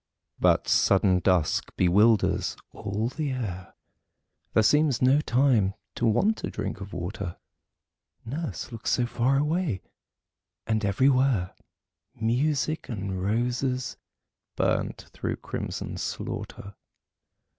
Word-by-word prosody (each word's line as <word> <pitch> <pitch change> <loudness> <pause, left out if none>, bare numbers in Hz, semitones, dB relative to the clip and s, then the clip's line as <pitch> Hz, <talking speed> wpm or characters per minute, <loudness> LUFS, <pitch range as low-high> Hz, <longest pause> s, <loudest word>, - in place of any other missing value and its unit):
But - - +3
sudden 95 -2 +4
dusk 90 -4 +1
bewilders 105 +4 +3
all 105 +3 -3
the 145 +1 -3
air 95 -8 -5 0.8
There 110 - +4
seems 150 0 +3
no 130 +3 +4
time 120 -8 +2 0.2
to 120 - 0
want 200 - +2
a - - -1
drink 100 -1 -4
of 100 0 -7
water. 90 +1 -5 0.9
Nurse 145 +3 -4
looks 115 -2 -4
so 125 - +2
far 125 +3 +1
away. 150 - 0 0.8
And 110 -1 0
everywhere 125 -1 +2 0.6
Music 140 +7 0
and 95 -4 -3
roses 125 +5 -1 0.6
burnt - - 0
through - - -3
crimson - - -5
slaughter. 100 +1 -5
115 Hz, 105 wpm, -27 LUFS, 100-135 Hz, 0.9 s, sudden